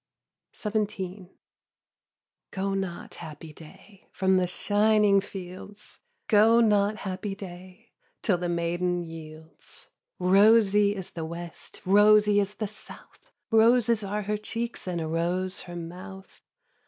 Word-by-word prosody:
XVII. 200 -3 -3 1.2
Go 195 0 -2
not, 190 -3 -4
happy 155 -1 -10
day, 175 +6 -16
From 190 0 +2
the 180 -1 +1
shining 205 +1 +3
fields, 195 +1 -10 0.3
Go 225 +2 +5
not, 210 -2 +3
happy 190 +1 -4
day. 185 +3 -11 0.3
Till 185 -5 +2
the 175 0 -2
maiden 175 +1 -1
yields. 160 -1 -11 0.3
Rosy 205 +2 +4
is 190 -1 -7
the 165 - -6
West, 170 +1 -8
Rosy 205 +1 +5
is 200 0 -2
the 215 - -3
South, 210 +1 -13 0.2
Roses 230 0 +4
are 205 +2 -3
her 210 +1 -1
cheeks, 230 +1 -5
And 175 -2 -2
a 160 - -3
rose 180 +3 -1
her 175 - -7
mouth. 185 +3 -10
195 Hz, 120 wpm, -27 LUFS, 175-210 Hz, 1.2 s, Go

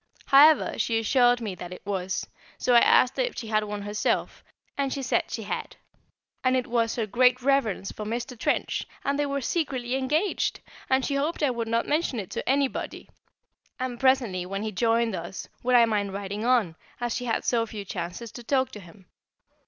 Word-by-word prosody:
However, 295 +2 +6
she 230 - +1
assured 245 +2 +3
me 210 -4 -3
that 180 -1 -8
it 180 - -10
was, 190 -2 -2 0.3
so 250 - +1
I 240 - +9
asked 255 +1 +4
her - - +2
if - - -4
she 225 - -5
had 215 -1 +2
one 205 -1 -5
herself, 205 +1 -1 0.3
and 275 -1 -1
she 275 0 -3
said 255 - 0
she - - -4
had, - - -5 0.7
and 255 0 +3
it 250 - -1
was 230 -1 0
her 230 - -1
great 250 +3 +3
reverence 265 -8 +1
for 215 - -7
Mr. 235 +4 -4
Trench, 235 - -1 0.2
and 280 +1 0
they 290 - +1
were 280 0 -2
secretly 260 -4 -2
engaged! 300 +9 0 0.3
and 265 0 +2
she 285 - -1
hoped 295 +3 -1
I 280 - +3
would 235 -2 -3
not 230 +1 0
mention 295 -5 0
it 195 - -7
to - - -4
anybody; 275 0 -1 0.7
and 255 -2 -3
presently, 250 -9 +2
when 195 +3 -4
he 220 - -2
joined 230 +2 +1
us, 175 +2 -6
would 250 +1 +2
I 235 -1 +7
mind 205 -3 -1
riding 200 +2 -4
on, 230 -10 +2 0.2
as 240 -1 -2
she 245 - -3
had 230 - -1
so 235 -2 +2
few 210 -2 -7
chances 185 +6 -5
to 240 - -10
talk 260 +1 +1
to 210 - -9
him? 190 +1 -16
235 Hz, 200 wpm, -26 LUFS, 210-265 Hz, 0.7 s, I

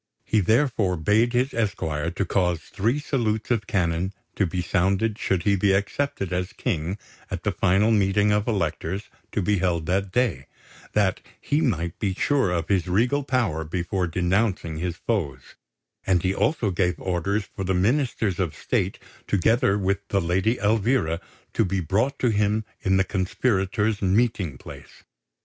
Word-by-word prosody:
He 110 - +2
therefore 110 -3 +2
bade 105 +9 +2
his 125 +2 +1
esquire 80 -8 -1
to 95 +3 -2
cause 90 -3 +1
three 110 - -1
salutes 120 -7 -1
of 110 -4 0
cannon 90 0 0 0.2
to 100 - +1
be 90 +2 -3
sounded 100 +4 +1
should 95 -3 0
he 100 +1 +3
be 100 0 +3
accepted 100 -1 -1
as 90 +1 -2
King 90 - -2 0.3
at - - -5
the - - +1
final 100 +5 +3
meeting 105 0 +3
of 105 +1 +1
Electors 95 -1 -2 0.2
to 105 - -1
be 100 +1 +1
held 85 -3 0
that 95 +3 0
day, 105 - 0 0.5
that 100 -3 +2 0.2
he 145 +2 0
might 85 - -1
be 95 -3 -1
sure 140 -4 +2
of 85 -2 -1
his 95 -3 +1
regal 120 +10 +2
power 115 - 0
before 90 +3 -2
denouncing 90 -1 0
his 85 0 -3
foes; 75 - -3 0.5
and 90 -2 +2
he 95 0 +1
also 105 +1 +1
gave 90 0 0
orders 95 +3 -1
for 95 - -7
the 95 0 0
Ministers 110 - +1
of 90 -5 -1
State, - - -1 0.3
together 100 +1 +2
with 100 0 -1
the 100 - +1
Lady 95 +7 +1
Elvira, 105 -5 +1 0.3
to - - +2
be 95 -1 -1
brought 105 - 0
to 125 - +1
him 105 0 +1 0.2
in 95 0 +2
the 95 - +4
conspirators' 100 +2 0
meeting 95 - +1
place. - - -12
100 Hz, 165 wpm, -24 LUFS, 90-110 Hz, 0.5 s, the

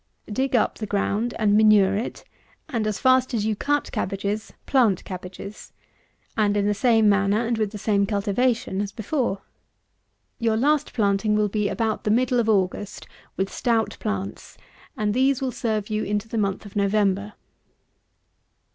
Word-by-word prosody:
Dig 260 +4 0
up 225 - +1
the 215 - -4
ground 205 +4 -1
and 210 -2 +3
manure 210 -2 +5
it, 220 +4 -4 0.4
and, 230 -8 -2
as 215 - -1
fast 255 -1 +3
as 210 -2 0
you 220 -1 0
cut 290 +7 -1
cabbages, 200 +2 -3
plant 235 -9 +2
cabbages; 185 +2 -8 0.6
and 210 -2 +2
in 200 - +1
the 210 - +2
same 225 0 +3
manner 200 +2 +2
and 230 -1 -1
with 215 -2 +1
the 215 - -6
same 200 -1 +1
cultivation 205 0 0
as 205 -1 -3
before. 220 -2 -2 1.0
Your 225 -1 +1
last 290 +4 +1
planting 210 -1 +2
will 210 -1 +2
be 210 0 0
about 220 -1 -1
the - - -1
middle 245 +2 +2
of 225 -1 +1
August, 200 0 -1 0.3
with 195 0 -2
stout 230 -3 0
plants, 100 0 -5 0.4
and 210 -1 0
these 260 +2 +2
will 265 -1 -2
serve 215 -3 -2
you 215 0 0
into 210 +1 -2
the 225 0 -2
month 200 0 -1
of 205 - -12
November. 200 0 +1
215 Hz, 165 wpm, -24 LUFS, 200-230 Hz, 1.0 s, manure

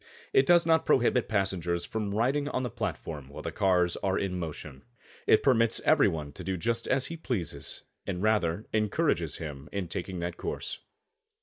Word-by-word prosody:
It 135 - +5
does 175 -1 +6
not 160 -1 +4
prohibit 125 -1 +3
passengers 95 -5 0
from 105 -2 -3
riding 135 +6 +1
on 130 - -1
the 125 - -3
platform 75 -8 -4
while 70 - -9
the - - -3
cars 90 -4 +2
are 95 -1 0
in 90 -2 -2
motion. 75 -4 -6 0.5
It - - +5
permits 115 -4 +3
every - - +5
one 75 -3 -3
to - - -9
do 95 -1 -2
just 115 +6 -1
as 130 0 +2
he 165 - -4
pleases 115 - -4 0.2
and 95 -1 -2
rather 105 -3 +1
encourages 105 -2 +1
him 75 -3 -7
in 100 -3 -3
taking 90 +2 -4
that 85 0 -3
course. - - -4
95 Hz, 180 wpm, -29 LUFS, 85-115 Hz, 0.5 s, does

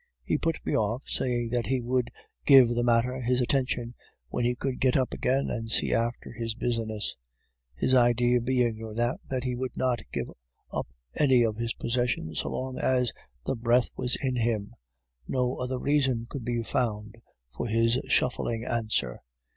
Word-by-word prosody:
He - - 0
put 165 -1 -1
me - - 0
off, 110 +4 0
saying 120 -2 -1
that 120 -1 0
he 130 0 +1
would 125 0 0 0.3
give 135 -4 +8
the 120 0 0
matter 120 +2 +2
his 125 +1 +1
attention 125 -2 0 0.4
when 120 - -1
he 120 +1 +1
could 130 +1 -3
get 130 0 +3
up 130 -2 0
again 135 +2 0
and 115 -1 -3
see - - +1
after 115 +1 -1
his 115 -2 -4
business; 115 -3 -2 0.6
his 130 - +1
idea 120 0 +4
being 120 -2 +1
no 110 -1 -7
doubt 120 +2 0
that 130 -2 -1
he 125 -1 -1
would 130 +1 -4
not 125 -2 +1
give - - -2 0.5
up - - -2 0.3
any 130 -4 +4
of 110 -2 0
his 115 0 -2
possessions 120 - -1
so - - -2
long 130 0 -4
as 125 -2 +2 0.3
the - - 0
breath 120 +1 +2
was 125 - -1
in 130 -2 0
him; 110 -3 -1 0.5
no 125 -1 0
other 125 +1 -2
reason 130 -4 +1
could 135 -1 -6
be 120 -1 -1
found 110 -3 -2 0.4
for - - -3
his 115 +2 +2
shuffling 120 -2 +1
answer. 110 - -1
120 Hz, 175 wpm, -28 LUFS, 115-130 Hz, 0.6 s, give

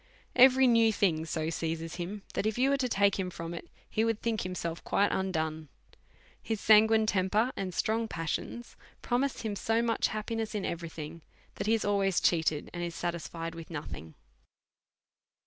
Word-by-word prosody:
Every 260 +1 +7
new 230 -2 +5
thing 165 -6 +1
so 160 0 -2
seizes 165 0 -3
him, 190 +3 -5
that 215 - 0
if 220 - -1
you 265 +2 +3
were 280 - +3
to 255 -2 -1
take 200 -2 +2
him 185 -1 -1
from 165 -1 -6
it, 170 - -7 0.2
he 220 - 0
would 225 -1 0
think 230 -2 -1
himself 175 -2 -4
quite 200 +1 +2
undone. 160 -4 -2 0.7
His 225 -2 -3
sanguine 220 +1 +6
temper 205 +4 +1
and 190 -2 -3
strong 225 +5 0
pas 165 -5 -3
sions 240 0 -5 0.3
promise 260 +2 0
him 215 -3 -3
so 225 +3 +1
much 230 -1 +1
happiness 220 0 -3
in 205 - -2
every 170 -1 -4
thing', 160 +1 -8 0.3
that - - -4
he 225 - +4
is 225 - -2
always 195 -2 +2
cheated, 160 -3 +1
and 175 - -4
is 170 -1 -4
satisfied 165 -1 -4
with 165 -1 -9
no 155 -3 -4
thing. 80 0 -9
195 Hz, 180 wpm, -30 LUFS, 165-225 Hz, 0.7 s, Every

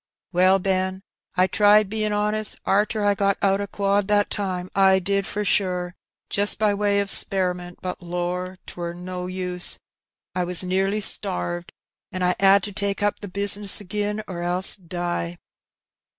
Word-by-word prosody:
'' - - -69
Well, 185 +2 +4
Ben, 190 0 -1 0.3
I 185 0 +4
tried 205 +2 +4
bein' 215 +1 -1
honest 210 0 -1
arter 210 +1 +1
I 205 - +4
got 200 -1 0
out 195 0 +1
o' 200 - -4
quad 200 0 0
that 205 -1 +1
time. 185 -3 -3
I 190 -1 +4
did 195 +1 -1
for 210 0 -3
sure, 180 -3 0 0.3
jist 205 +1 +1
by 210 -1 +2
way 200 0 +1
of 200 -1 -2
speriment; 180 -2 +3
but 185 0 -5
lor! 180 +1 -4
'twere 170 -1 -6
no 180 0 -6
use 180 -1 -2 0.3
— - - -69
I 180 - 0
was 180 0 -3
nearly 195 +3 0
starved, 85 - +2 0.4
an' 185 -1 -3
I 180 0 +2
'ad 195 0 +5
to 205 - -4
take 200 0 -2
up 205 - 0
the 205 - -7
bizness 200 +1 +3
agin 210 +2 -3
or 175 -2 -6
else 180 +2 +2
die." 175 - -4
190 Hz, 170 wpm, -23 LUFS, 180-205 Hz, 0.4 s, ad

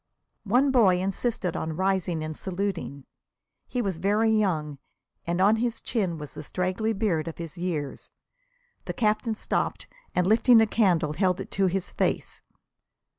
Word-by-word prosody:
One 250 +7 +3
boy 200 -9 +4
insisted 195 -1 -2
on 160 0 -3
rising 185 -4 0
and 155 0 -5
saluting. 180 -7 -4 0.6
He 250 -1 -2
was 190 -5 -2
very 210 +5 +2
young, 160 -10 0 0.5
and 175 +1 0
on 205 +4 +5
his 230 0 -1
chin 190 -8 -2
was 150 -2 -7
the - - -7
straggly 185 +5 -1
beard 195 -7 0
of 165 - -6
his 165 -1 -7
years. 170 -6 -4 0.7
The - - -3
Captain 220 0 0
stooped, - - -2 0.3
and 180 - +2
lifting 225 +4 +6
a 225 - +5
candle 180 -9 +2
held 185 +2 +1
it - - -7
to 195 -1 +2
his 185 +1 0
face. - - -2
190 Hz, 155 wpm, -26 LUFS, 170-220 Hz, 0.7 s, lifting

